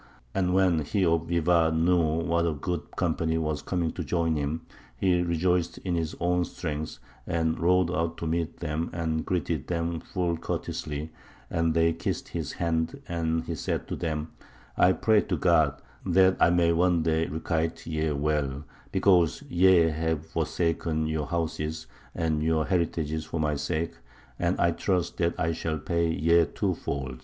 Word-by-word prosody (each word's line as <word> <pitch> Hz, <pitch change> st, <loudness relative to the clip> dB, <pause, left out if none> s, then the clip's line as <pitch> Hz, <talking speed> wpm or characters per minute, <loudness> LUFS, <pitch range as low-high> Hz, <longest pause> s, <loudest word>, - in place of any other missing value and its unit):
And 90 Hz, -1 st, +1 dB
when 95 Hz, -4 st, +4 dB
he 95 Hz, +6 st, 0 dB
of 85 Hz, -1 st, +1 dB
Bivar 85 Hz, -1 st, +3 dB
knew 80 Hz, -1 st, +2 dB
what 85 Hz, 0 st, +2 dB
a 80 Hz, -, 0 dB
goodly 85 Hz, +3 st, -3 dB
company 80 Hz, 0 st, 0 dB
were 75 Hz, -1 st, 0 dB
coming 85 Hz, -1 st, -2 dB
to -, -, -5 dB
join 85 Hz, -2 st, 0 dB
him, 75 Hz, +2 st, -2 dB, 0.4 s
he 90 Hz, -2 st, +2 dB
rejoiced 85 Hz, 0 st, +1 dB
in 90 Hz, -, -3 dB
his 80 Hz, -2 st, -1 dB
own 90 Hz, +1 st, +2 dB
strength, 80 Hz, -3 st, -5 dB, 0.3 s
and 80 Hz, -1 st, 0 dB
rode 90 Hz, +1 st, +3 dB
out 85 Hz, -1 st, -1 dB
to -, -, -5 dB
meet 85 Hz, 0 st, -2 dB
them 80 Hz, 0 st, -2 dB
and 80 Hz, -2 st, -1 dB
greeted 85 Hz, -5 st, -2 dB
them 85 Hz, -1 st, -1 dB
full 85 Hz, -2 st, -2 dB
courteously; 75 Hz, -1 st, -4 dB, 0.4 s
and 80 Hz, -1 st, +1 dB
they 85 Hz, 0 st, +3 dB
kissed 80 Hz, -, -3 dB
his -, -, -4 dB
hand, 80 Hz, -1 st, -1 dB
and 80 Hz, -1 st, -1 dB
he -, -, -4 dB
said -, -, -3 dB
to -, -, -2 dB
them, 80 Hz, -2 st, -3 dB, 0.4 s
I 90 Hz, -, +5 dB
pray 110 Hz, +1 st, +3 dB
to 90 Hz, -, -2 dB
God 75 Hz, -4 st, +3 dB, 0.2 s
that 95 Hz, +1 st, +4 dB
I -, -, +6 dB
may 85 Hz, -1 st, +3 dB
one 85 Hz, -1 st, +3 dB
day 80 Hz, 0 st, +1 dB
requite 80 Hz, +2 st, -2 dB
ye 80 Hz, -1 st, -1 dB
well, 70 Hz, -1 st, -1 dB, 0.3 s
because 90 Hz, -5 st, +3 dB
ye 90 Hz, -1 st, +5 dB
have 80 Hz, 0 st, -1 dB
forsaken 80 Hz, -1 st, -1 dB
your 80 Hz, -2 st, -2 dB
houses 80 Hz, -2 st, -2 dB, 0.3 s
and 80 Hz, -3 st, 0 dB
your 80 Hz, 0 st, +1 dB
heritages 80 Hz, -4 st, -1 dB
for 80 Hz, -, -4 dB
my 75 Hz, -1 st, +1 dB
sake, 80 Hz, +3 st, -2 dB, 0.5 s
and 85 Hz, +1 st, 0 dB
I 85 Hz, -, +4 dB
trust 90 Hz, +1 st, -1 dB
that 85 Hz, -1 st, 0 dB
I 85 Hz, -1 st, +1 dB
shall 80 Hz, -1 st, -2 dB
pay 85 Hz, +2 st, 0 dB
ye 85 Hz, +2 st, +4 dB
twofold. 65 Hz, -4 st, -3 dB
80 Hz, 165 wpm, -27 LUFS, 80-85 Hz, 0.5 s, I